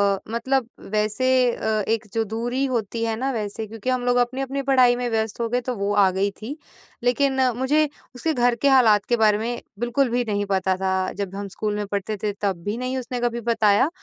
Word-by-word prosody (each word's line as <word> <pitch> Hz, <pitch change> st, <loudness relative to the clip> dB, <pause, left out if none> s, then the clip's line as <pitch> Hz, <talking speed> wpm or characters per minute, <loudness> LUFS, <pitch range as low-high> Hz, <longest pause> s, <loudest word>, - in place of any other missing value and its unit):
अ, -, -, -8 dB
मतलब 245 Hz, +1 st, 0 dB, 0.2 s
वैसे 215 Hz, +4 st, 0 dB, 0.3 s
अ, -, -, -7 dB, 0.2 s
एक 225 Hz, 0 st, 0 dB
जो 225 Hz, -, +1 dB
दूरी 240 Hz, +5 st, -2 dB
होती 230 Hz, -3 st, -2 dB
है 225 Hz, -1 st, -1 dB
ना 265 Hz, +4 st, -1 dB
वैसे 220 Hz, -2 st, -4 dB
क्योंकि 225 Hz, +3 st, -5 dB
हम 255 Hz, -1 st, 0 dB
लोग 245 Hz, 0 st, +3 dB
अपनी-अपनी 265 Hz, +3 st, 0 dB
पढ़ाई 255 Hz, -3 st, +5 dB
में 245 Hz, 0 st, -2 dB
व्यस्त 220 Hz, -1 st, -1 dB
हो 230 Hz, -, 0 dB
गए, 245 Hz, +2 st, 0 dB
तो 250 Hz, 0 st, -3 dB
वो 200 Hz, 0 st, -1 dB
आ 200 Hz, -2 st, +5 dB
गई 195 Hz, +2 st, 0 dB
थी 265 Hz, +8 st, -6 dB, 0.5 s
लेकिन 265 Hz, +2 st, +2 dB, 0.2 s
मुझे 295 Hz, +4 st, +2 dB, 0.3 s
उसके 315 Hz, +6 st, -1 dB
घर 245 Hz, -2 st, +2 dB
के 280 Hz, +5 st, +2 dB
हालात 225 Hz, -6 st, +5 dB
के 240 Hz, -, +4 dB
बारे 215 Hz, -2 st, +4 dB
में 235 Hz, +2 st, -3 dB, 0.2 s
बिल्कुल 240 Hz, +3 st, +1 dB
भी 245 Hz, +1 st, +1 dB
नहीं 205 Hz, -2 st, -1 dB
पता 190 Hz, -1 st, +2 dB
था, 190 Hz, 0 st, 0 dB
जब 195 Hz, -1 st, -5 dB
हम 200 Hz, 0 st, -4 dB
स्कूल 210 Hz, +2 st, -3 dB
में 210 Hz, 0 st, -2 dB
पढ़ते 200 Hz, +1 st, -3 dB
थे 210 Hz, -, +1 dB
तब 190 Hz, -4 st, -1 dB
भी 205 Hz, +4 st, -2 dB
नहीं 255 Hz, +1 st, -2 dB
उसने 250 Hz, -1 st, -4 dB
कभी 235 Hz, -1 st, -1 dB
बताया 215 Hz, +4 st, +3 dB
230 Hz, 220 wpm, -23 LUFS, 210-250 Hz, 0.5 s, पढ़ाई